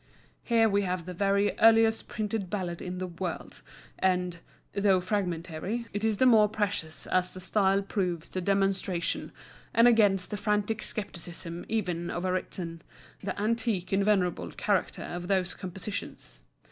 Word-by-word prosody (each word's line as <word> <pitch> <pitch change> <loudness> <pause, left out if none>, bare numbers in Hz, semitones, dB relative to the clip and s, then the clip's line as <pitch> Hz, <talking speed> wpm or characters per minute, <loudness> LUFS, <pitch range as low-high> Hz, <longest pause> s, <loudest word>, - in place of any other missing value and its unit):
Here 230 -2 +3
we 200 -1 +2
have 180 -3 -2
the 180 - -6
very 200 +2 +2
earliest 225 0 +5
printed 210 -3 -3
ballad 180 -4 -3
in 180 0 -5
the 185 - -2
world, 175 -1 -5 0.4
and, 180 -2 +1 0.3
though 200 -2 +3
fragmentary, 185 +3 -2
it 205 +1 -2
is 220 -2 +2
the 260 - +4
more 220 -4 +6
precious 200 -7 -2
as 180 0 0
the - - -6
style 195 +1 +2
proves 180 -5 -2
to 185 - -3
demonstration, 195 -2 0 0.4
and 230 +1 +7
against 205 -5 +4
the 210 - -2
frantic 210 +1 0
scepticism 170 -4 -3
even 180 -6 -1
of 175 +1 -3
a 185 - +1
Ritson, 175 -2 -3 0.4
the 195 0 -4
antique 220 -3 0
and 195 0 +3
venerable 180 - +1
character - - 0
of 175 0 -5
those 185 -2 +1
compositions. 185 - -7
190 Hz, 150 wpm, -29 LUFS, 180-210 Hz, 0.4 s, and